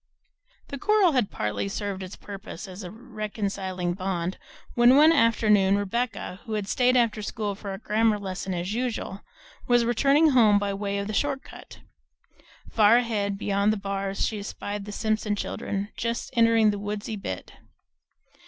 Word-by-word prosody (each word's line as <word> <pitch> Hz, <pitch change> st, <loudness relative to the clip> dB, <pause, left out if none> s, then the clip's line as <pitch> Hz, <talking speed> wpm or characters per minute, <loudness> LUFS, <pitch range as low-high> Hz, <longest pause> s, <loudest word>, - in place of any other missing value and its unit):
The 280 Hz, -, -6 dB
coral 420 Hz, -2 st, +4 dB
had 250 Hz, -8 st, +1 dB
partly 105 Hz, -, -2 dB
served 200 Hz, -1 st, -4 dB
its 185 Hz, 0 st, -7 dB
purpose 200 Hz, -1 st, -9 dB
as 185 Hz, +2 st, -9 dB
a 180 Hz, -, -7 dB
reconciling 200 Hz, -5 st, -4 dB
bond, 185 Hz, -1 st, -3 dB, 0.3 s
when 240 Hz, +2 st, +6 dB
one 310 Hz, +2 st, +7 dB
afternoon 215 Hz, -7 st, +4 dB
Rebecca, 205 Hz, -1 st, -3 dB
who 225 Hz, -, -5 dB
had 210 Hz, -2 st, -2 dB
stayed 250 Hz, +4 st, +3 dB
after 225 Hz, -3 st, +2 dB
school 205 Hz, 0 st, -3 dB
for 200 Hz, 0 st, -8 dB
her 195 Hz, -, -4 dB
grammar 215 Hz, +1 st, +1 dB
lesson 190 Hz, -1 st, -5 dB
as 175 Hz, +4 st, -3 dB
usual, 230 Hz, -5 st, -3 dB, 0.5 s
was 240 Hz, -1 st, +4 dB
returning 275 Hz, +6 st, +4 dB
home 220 Hz, -6 st, +5 dB
by 205 Hz, -1 st, -1 dB
way 200 Hz, 0 st, -2 dB
of 200 Hz, -, -2 dB
the 215 Hz, -, -4 dB
short 275 Hz, +4 st, 0 dB
cut. -, -, -13 dB, 0.9 s
Far 220 Hz, +1 st, +6 dB
ahead, 210 Hz, -5 st, -1 dB
beyond 200 Hz, +1 st, +1 dB
the 215 Hz, -, -1 dB
bars, 195 Hz, 0 st, -2 dB
she 215 Hz, -, -3 dB
espied 205 Hz, 0 st, -5 dB
the 210 Hz, -, -7 dB
Simpson 215 Hz, 0 st, -1 dB
children 200 Hz, 0 st, -4 dB
just 230 Hz, 0 st, -3 dB
entering 230 Hz, -2 st, +5 dB
the 205 Hz, -, -4 dB
woodsy 205 Hz, +1 st, -4 dB
bit. 95 Hz, -, -6 dB
210 Hz, 160 wpm, -26 LUFS, 195-230 Hz, 0.9 s, one